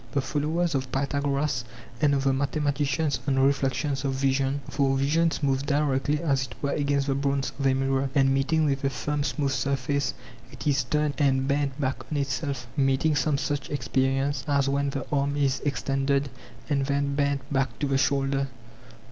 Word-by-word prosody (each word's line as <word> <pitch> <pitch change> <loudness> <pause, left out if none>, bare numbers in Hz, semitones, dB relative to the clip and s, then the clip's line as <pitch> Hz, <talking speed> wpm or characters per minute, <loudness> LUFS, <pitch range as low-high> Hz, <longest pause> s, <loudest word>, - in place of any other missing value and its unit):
The 140 - +2
followers 155 +5 -1
of 130 -2 -2
Pytha 140 +1 -1
goras 140 -2 0 0.4
and 145 -2 +4
of 135 - 0
the 135 -1 +3
mathematicians 145 0 0
on 135 -1 +2
reflections 135 0 +1
of 135 -1 0
vision: 135 +1 +1
For 135 -1 +1
vision 160 +5 +2
moves 135 -1 +2
directly 145 0 +1
as 135 -4 +1
it - - -11
were 140 - -1
against 140 -1 +1
the 140 - +1
bronze 140 0 0
[of 140 - +2
a 130 - +3
mirror], 135 0 0
and 135 -1 +4
meeting 155 +4 +2
with 140 -2 0
a 135 - +2
firm 145 +4 -2
smooth 140 0 -1
surface 135 0 -1 0.4
it 135 - -9
is 135 -4 +2
turned 150 +3 0
and 135 -2 +2
bent 140 0 0
back 135 -1 -1
on 150 - 0
itself, 140 -2 -2
meeting 135 +3 +2
some 145 0 +1
such 145 -1 -2
experience 135 +1 0
as 140 -1 +2
when 140 +1 +1
the 135 0 -4
arm 140 0 0
is 135 -1 +1
extended 140 0 0 0.4
and 140 -2 0
then 140 0 0
bent 140 -1 +1
back 130 -4 0
to 150 - -1
the 135 -1 +1
shoulder. 135 0 +1
140 Hz, 180 wpm, -26 LUFS, 135-145 Hz, 0.4 s, and